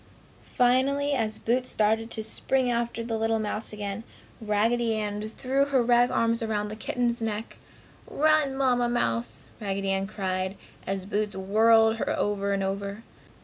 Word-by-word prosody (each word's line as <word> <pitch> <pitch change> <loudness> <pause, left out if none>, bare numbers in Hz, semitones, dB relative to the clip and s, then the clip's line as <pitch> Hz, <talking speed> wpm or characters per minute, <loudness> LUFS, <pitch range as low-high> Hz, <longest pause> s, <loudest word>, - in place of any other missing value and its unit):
Finally 275 +3 +3
as 220 -5 -1
Boots 250 +2 0
started 220 +1 +1
to 220 -1 -2
spring 250 +3 +1
after 235 0 -2
the 225 -1 -3
little 225 0 +1
mouse 215 0 -3
again, 205 0 -5 0.4
Raggedy 225 +2 +1
Ann 210 -1 -2
threw 260 +6 0
her 270 -3 +2
rag 240 +1 +4
arms 230 0 +1
around 210 -2 -1
the 215 - -6
kitten's 235 +1 -1
neck. 220 0 -4 0.5
"Run, 305 -2 +2
Mamma 250 -3 +2
mouse!" 125 - -1
Raggedy 195 -1 -2
Ann 195 0 0
cried, 190 -1 -3 0.3
as 195 -1 -2
Boots 210 0 -2
whirled 220 +3 +4
her - - -2
over 200 -1 0
and 195 -1 0
over. 200 +2 -4
220 Hz, 150 wpm, -27 LUFS, 205-240 Hz, 0.5 s, rag